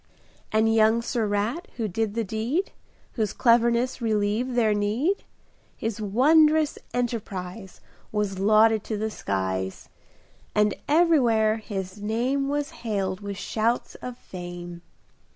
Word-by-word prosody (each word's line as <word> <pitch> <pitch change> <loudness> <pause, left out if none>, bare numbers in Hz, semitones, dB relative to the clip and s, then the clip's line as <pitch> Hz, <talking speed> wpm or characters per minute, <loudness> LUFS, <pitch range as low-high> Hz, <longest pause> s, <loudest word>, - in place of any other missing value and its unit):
And 220 +1 +3
young 225 +1 +4
Sir 230 -2 -1
Rat 210 - -1
who 225 -3 -1
did 210 +2 -2
the 230 - 0
deed, 225 - -2 0.4
Whose 215 -4 -2
cleverness 235 +1 +3
relieved 220 +3 0
their 220 -3 +3
need, 220 - 0 0.5
His 225 -1 -3
wondrous 300 +8 +4
enterprise 200 -5 -4 0.3
Was 205 -3 -1
lauded 215 +1 +4
to 215 - -3
the 220 +1 -2
skies. 95 - -3 0.7
And 210 -1 +3
everywhere 250 -10 +4
his 200 -2 -6
name 245 +6 0
Was 290 +1 -1
hailed 195 -5 -2
with 200 -1 -6
shouts 225 +4 -1
of 250 -1 -6
fame. 175 -3 -8
220 Hz, 120 wpm, -25 LUFS, 205-240 Hz, 0.7 s, young